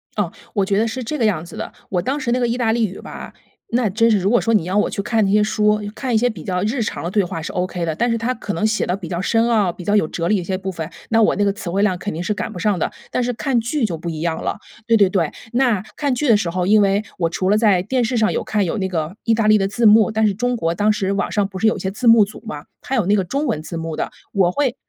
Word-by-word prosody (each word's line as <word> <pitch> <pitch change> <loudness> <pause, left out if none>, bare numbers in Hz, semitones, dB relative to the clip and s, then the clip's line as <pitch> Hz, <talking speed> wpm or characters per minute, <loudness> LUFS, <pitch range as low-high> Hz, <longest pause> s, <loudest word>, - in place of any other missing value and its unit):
哦， 200 -5 -1 0.2
我 200 -2 +1
觉 195 0 0
得 225 - +2
是 255 +3 -4
这 300 +6 -3
个 235 - +1
样 180 -7 +1
子 - - -11
的。 - - -5 0.2
我 180 -2 0
当 270 +7 -2
时 245 -4 -2
那 250 - +1
个 240 - +1
意 235 +1 -1
大 225 -3 +1
利 225 -2 +1
语 190 - -9
吧， - - -9 0.4
那 235 -2 +2
真 230 +4 +3
是 215 - +4
如 195 +1 0
果 240 - +4
说 230 - +1
你 210 - +3
要 180 +3 -3
我 210 - +2
去 200 - -3
看 220 +1 +1
那 195 - +1
些 210 0 +4
书， 210 0 +2
看 255 -1 -3
一 220 - +4
些 245 +3 +2
比 185 -9 -8
较 180 -1 -2
日 235 +4 -1
常 210 - -3
的 175 - -3
对 205 -1 +2
话 175 -2 -4
是 160 - -5
ok 180 -1 -2
的。 160 - -1
但 240 +5 +1
是 230 - +1
它 240 +3 -1
可 205 -4 -5
能 190 +6 -1
写 215 0 +1
得 180 - 0
比 180 -4 -8
较 175 -1 -3
深 225 +4 +2
奥， 210 -6 +2
比 180 - -10
较 205 +3 +1
有 180 -7 +3
哲 165 +1 -3
理 215 - +3
的 - - -2
一 - - -6
些 185 +1 -2
部 190 0 -4
分， 165 -2 -5 0.2
那 225 0 +3
我 - - +3
那 205 - +1
个 200 - +2
词 195 - -6
汇 195 +4 +1
量 190 -3 +2
肯 205 - -4
定 165 +3 -4
是 210 - 0
赶 - - -4
不 - - -8
上 205 -2 0
的。 - - -1 0.2
但 250 - 0
是 245 - 0
看 250 0 0
剧 240 +3 -1
就 175 -6 -2
不 170 +2 -5
一 155 -1 -5
样 165 -1 -1
了 - - -2 0.3
对 230 - +5
对 200 -3 +5
对， 175 -5 0 0.2
那 240 -6 +2
看 280 -4 0
剧 295 +3 -1
的 225 - +7
时 200 -5 0
候， 180 +1 -1
因 210 +2 +5
为 200 +1 +2 0.2
我 165 -2 +1
除 185 +3 -1
了 210 - +4
在 200 -5 +3
电 250 +4 0
视 235 +1 -1
上 215 -1 +2
有 - - -1
看 205 -3 0
有 170 - -2
那 190 - 0
个 165 0 -3
意 230 - +2
大 220 -1 0
利 215 0 +6
的 195 - +1
字 215 +4 -1
幕， 215 0 +6
但 220 0 +1
是 205 - +2
中 245 +4 -1
国 165 -6 -1
当 205 +4 +2
时 195 -2 -1
网 200 - -1
上 205 -2 +1
不 190 -2 -8
是 225 - +3
有 - - +2
一 - - -6
些 190 +1 -3
字 235 +4 -2
幕 230 -2 +7
组 205 - -12
嘛， 150 -8 -6 0.2
它 265 - -3
有 220 -7 +1
那 205 +2 +3
个 195 - +1
中 280 - -2
文 155 - -1
字 170 +1 -6
幕 165 -1 -4
的， - - -2 0.2
我 185 -3 +3
会 270 -1 0
205 Hz, 360 characters per minute, -20 LUFS, 185-230 Hz, 0.4 s, 的